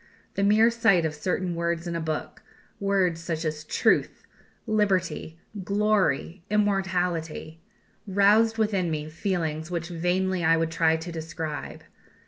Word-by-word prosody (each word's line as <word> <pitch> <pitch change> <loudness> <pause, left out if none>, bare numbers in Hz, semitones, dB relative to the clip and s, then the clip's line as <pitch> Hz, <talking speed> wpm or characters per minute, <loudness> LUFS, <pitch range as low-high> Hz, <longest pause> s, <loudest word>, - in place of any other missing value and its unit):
The - - -2
mere 215 +3 +5
sight 220 -7 +3
of 155 - -1
certain 180 +3 -2
words 170 0 -2
in 170 -1 -3
a 165 - -2
book 160 -1 -4 0.4
words 190 -4 +1
such 165 -1 -3
as 155 -1 -3
Truth, - - +1 0.4
Liberty, 190 -6 0 0.2
Glory, 200 -4 +1
Immortality 180 -6 -1 0.5
roused 210 +3 +4
within 200 -5 +1
me 155 -1 -3
feelings 160 -3 -2
which 170 -1 -3
vainly 180 +1 0
I 165 +1 +4
would 165 0 0
try 165 -1 +3
to 165 +2 -7
describe. 160 -1 -6
175 Hz, 130 wpm, -26 LUFS, 160-200 Hz, 0.5 s, mere